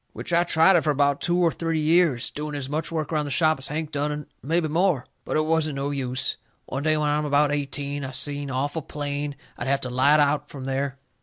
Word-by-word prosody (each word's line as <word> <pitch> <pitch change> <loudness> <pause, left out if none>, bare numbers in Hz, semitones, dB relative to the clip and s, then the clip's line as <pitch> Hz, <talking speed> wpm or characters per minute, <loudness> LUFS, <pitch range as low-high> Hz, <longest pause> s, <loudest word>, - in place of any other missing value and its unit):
Which - - -6
I 170 +1 +5
tried 170 +2 +4
it 170 - +5
fur 155 - -1
about 145 -1 +2
two 175 0 +1
or 175 -2 +3
three 165 -1 -1
years, 155 -5 +3
doing 150 0 -5
as 140 -2 -3
much 155 +4 -3
work 160 -1 -2
around 150 -1 +1
the - - -4
shop 155 +1 +2
as 130 - -2
Hank 155 +1 -3
done 145 0 -1
and 150 -1 -5 0.2
mebby 165 +3 0
more. 165 -3 +1 0.2
But - - -1
it 155 - +2
wasn't 155 -2 +1
no 140 +1 -2
use. 130 -2 -2 0.3
One 135 - -4
day 155 +1 +2
when 150 -1 +1
I'm 150 +1 +1
about 145 0 +3
eighteen, 145 0 -2
I 130 - -4
seen 140 +2 -2
awful 145 +5 -2
plain 145 0 -4 0.2
I'll 120 - -3
have 140 0 +1
to 125 - -4
light 140 +4 +4
out 145 0 +2
from 135 -2 -8
there. 135 0 -2
145 Hz, 240 wpm, -25 LUFS, 140-155 Hz, 0.3 s, I